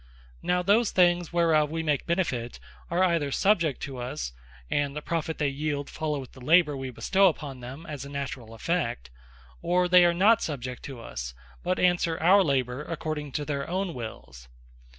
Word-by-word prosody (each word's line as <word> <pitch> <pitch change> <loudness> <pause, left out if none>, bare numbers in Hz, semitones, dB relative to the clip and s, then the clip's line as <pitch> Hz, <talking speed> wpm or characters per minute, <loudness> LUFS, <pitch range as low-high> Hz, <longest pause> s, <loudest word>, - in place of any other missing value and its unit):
Now 180 0 +1
those 210 +4 +4
things 175 -2 +3
whereof 165 -3 +3
we 165 +1 -3
make 150 -3 0
benefit, 130 - -1 0.3
are 175 +2 +2
either 165 -6 +1
subject 170 -5 +2
to 135 -3 -5
us, 120 - -4 0.3
and 145 - -1
the 150 - -4
profit 165 -1 -2
they 145 -2 0
yeeld, 145 0 -3
followeth 150 -4 -3
the 130 - -15
labour 155 +1 +4
we 135 -1 -5
bestow 195 - +3
upon 145 -6 -3
them, 130 +6 -9
as 150 -4 -6
a 140 - -8
naturall 130 -5 -5
effect; 115 - -2 0.5
or 180 0 +2
they 180 0 +7
are 175 0 +4
not 205 +5 +5
subject 125 -5 -4
to 135 -3 -7
us, - - -6 0.3
but 185 +1 0
answer 175 -2 +2
our 190 +5 +6
labour, 130 -4 0
according 155 -3 -4
to 150 - -2
their 140 -1 -3
own 185 0 -1
Wills. 65 - -8
150 Hz, 175 wpm, -27 LUFS, 130-175 Hz, 0.5 s, they